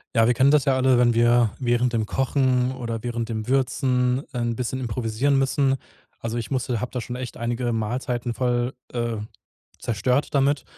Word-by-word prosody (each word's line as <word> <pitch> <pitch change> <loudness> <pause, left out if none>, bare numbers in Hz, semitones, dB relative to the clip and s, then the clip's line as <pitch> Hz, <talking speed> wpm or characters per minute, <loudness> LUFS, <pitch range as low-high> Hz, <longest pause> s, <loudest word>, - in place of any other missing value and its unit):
Ja, 115 0 +5
wir 120 - +4
kennen 135 +3 +4
das 150 -3 +4
ja 135 -2 +3
alle, 130 -1 +3
wenn 120 -1 +4
wir 120 -1 +4
während 120 0 +1
dem 110 -2 +1
Kochen 130 +1 +1
oder 115 -4 -5
während 120 -1 -3
dem 110 -1 -4
Würzen, 130 -1 +1
äh, - - -4
'n 120 -1 -1
bisschen 125 +2 -3
improvisieren 125 +3 0
müssen. 135 0 +2 0.4
Also, 115 +1 -3
ich 115 -3 -4
musste 125 -3 -1
hab 125 - -4
da 125 - -3
schon 120 +2 -6
echt 125 -1 -6
einige 120 +1 -2
Mahlzeiten 120 +2 -2
voll, 120 +1 0 0.2
äh, 120 -2 -1 0.6
zerstört 125 +6 0
damit. 140 0 +2
125 Hz, 185 wpm, -24 LUFS, 115-130 Hz, 0.6 s, Ja